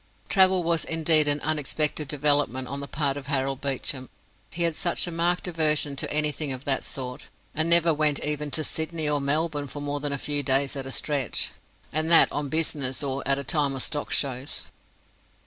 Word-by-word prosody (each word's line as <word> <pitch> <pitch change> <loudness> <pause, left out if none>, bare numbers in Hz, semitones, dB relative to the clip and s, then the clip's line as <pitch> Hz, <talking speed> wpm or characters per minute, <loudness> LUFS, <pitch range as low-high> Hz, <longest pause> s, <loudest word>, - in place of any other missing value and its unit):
Travel 190 -2 +5
was 165 0 +1
indeed 160 -2 +3
an 145 0 +1
unexpected 150 0 0
development 145 -3 +1
on 140 +2 -5
the 140 - -6
part 140 +1 -1
of 140 -2 -8
Harold 135 -1 -1
Beecham. 135 -1 -2 0.4
He 170 +9 -2
had 165 -2 +1
such 175 - +1
a 175 - -4
marked 175 +2 0
aversion 155 -4 +1
to - - -3
anything 150 -1 0
of 130 +1 -6
that 135 -2 +1
sort, 125 -2 -5 0.3
and 160 +2 0
never 170 -1 +5
went 150 -1 +2
even 150 0 -1
to 155 +3 0
Sydney 160 0 -2
or 145 -1 +1
Melbourne 145 +1 0
for 145 - -7
more 145 0 -3
than 145 0 -2
a 140 - -1
few 145 +1 -2
days 135 0 +1
at 135 -1 -4
a - - -5
stretch, 140 -4 0 0.4
and 155 +2 +1
that 170 - +7
on 145 -1 -2
business 145 -4 -1
or 135 0 -2
at 135 0 +3
a 140 - -3
time 140 +2 0
of 130 - -1
stock 150 -2 -2
shows. 135 0 -2
145 Hz, 200 wpm, -26 LUFS, 140-155 Hz, 0.4 s, that